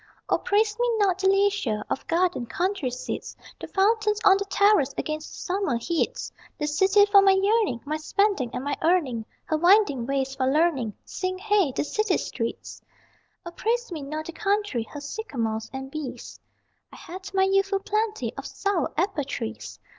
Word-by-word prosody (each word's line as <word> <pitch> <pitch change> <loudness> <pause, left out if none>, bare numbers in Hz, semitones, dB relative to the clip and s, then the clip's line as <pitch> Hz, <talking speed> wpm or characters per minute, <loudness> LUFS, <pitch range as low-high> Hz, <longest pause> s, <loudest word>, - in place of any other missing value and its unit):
O - - +2
praise 425 +1 +1
me 485 0 +2
not 385 -3 +2
the 380 - +2
leisure 390 - +1
Of - - -4
gardened 340 -8 0
country 365 -6 -1
seats, 250 +1 -6 0.2
The - - -7
fountains 425 +1 +2
on 390 -1 +7
the 400 - -3
terrace 400 -8 +3
against 310 0 -3
the - - -10
summer 370 -9 0
heats 340 - -2 0.3
The 300 - -2
city 385 +7 +4
for 410 -1 +6
my 390 -1 +5
yearning, 390 - +2
My 305 +2 -2
spending 390 - +1
and 250 - -4
my 285 +1 -1
earning. 300 -10 +1 0.2
Her 315 - 0
winding 345 - +4
ways 270 -1 -1
for 260 -1 -1
learning, 275 - +1
Sing 370 0 -3
hey! 400 -6 +2
the - - -1
city 425 +4 0
streets! 230 -2 -5 0.6
O 345 - -6
praise 470 +5 -1
me 320 -3 -5
not 305 +3 -5
the - - -6
country, 400 - -1
Her 290 - -8
sycamores 235 - -4
and 265 0 -7
bees, 300 -4 -7 0.5
I - - -12
had 375 +3 -9
my 380 - +4
youthful 390 +1 +2
plenty 430 +1 -1
of - - -5
sour 395 -7 -1
apple 355 -3 0
trees! 110 - -6
360 Hz, 175 wpm, -25 LUFS, 275-405 Hz, 0.6 s, on